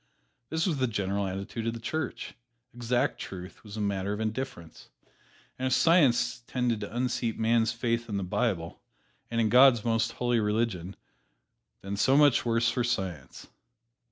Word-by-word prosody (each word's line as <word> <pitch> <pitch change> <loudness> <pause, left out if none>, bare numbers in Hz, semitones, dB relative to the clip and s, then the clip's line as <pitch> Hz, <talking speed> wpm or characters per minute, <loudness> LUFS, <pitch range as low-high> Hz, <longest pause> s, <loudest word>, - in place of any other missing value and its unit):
This 160 +1 0
was 170 -7 0
the 130 -1 +1
general 100 -2 -1
attitude 100 +4 -5
of 115 - -1
the - - -6
Church 150 +4 -4 0.4
exact 120 0 -1
truth 90 0 -8
was 105 0 -9
a - - -2
matter 100 0 -1
of 105 - -4
indifference. 110 -6 -5 0.7
And 130 - 0
if 130 - +1
Science 130 -8 +3
tended 125 -3 0
to 100 -1 -6
unseat 120 -2 -1
men's 115 0 +2
faith 115 0 -2
in 100 - -2
the 100 - -2
Bible, 90 -3 -2 0.5
and 115 - -1
in 110 -2 +2
God's 125 -1 +6
most 115 0 +1
holy 120 -1 +1
religion, 105 -4 -1 0.9
then 100 +1 -4
so 135 +7 +4
much 145 -4 +5
the 120 - -3
worse 115 0 +2
for 125 - -1
Science. 95 - -3
115 Hz, 165 wpm, -28 LUFS, 100-125 Hz, 0.9 s, God's